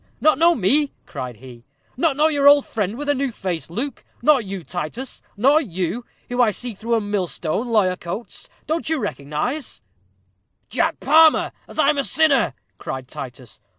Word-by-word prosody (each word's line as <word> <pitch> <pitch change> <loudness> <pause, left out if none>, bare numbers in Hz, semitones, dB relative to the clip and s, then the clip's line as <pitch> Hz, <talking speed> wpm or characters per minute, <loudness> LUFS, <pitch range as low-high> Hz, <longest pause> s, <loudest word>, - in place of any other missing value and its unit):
not 310 0 +3
know 340 +1 +5
me?" 275 +8 +3
cried 125 -2 -6
he 120 0 -13 0.3
"not 285 +1 +1
know 305 +1 +5
your 285 -3 +3
old 285 -1 +7
friend 210 0 -2
with 290 +1 -5
a 290 - +4
new 275 -1 -1
face, 180 -7 -4
Luke? 240 +10 -4 0.2
Nor 290 -1 +5
you, 195 -4 -6
Titus? 180 - -5 0.2
Nor 275 +8 +5
you, 195 - -3 0.2
who 245 - -4
can 245 -3 +4
see 245 +4 -5
through 230 +4 -1
a - - +3
millstone, 200 - -2
lawyer 205 -6 +2
Coates, 185 +7 -6 0.2
don't 320 0 -1
you 320 - +1
recognize 245 - -4 0.4
" - - -47
"Jack - - 0
Palmer, 320 0 +5 0.2
as - - -12
I'm 295 -1 +3
a - - +1
sinner!" 275 - +3 0.2
cried 130 -1 -5
Titus. 125 -2 -9
235 Hz, 175 wpm, -22 LUFS, 180-285 Hz, 0.4 s, old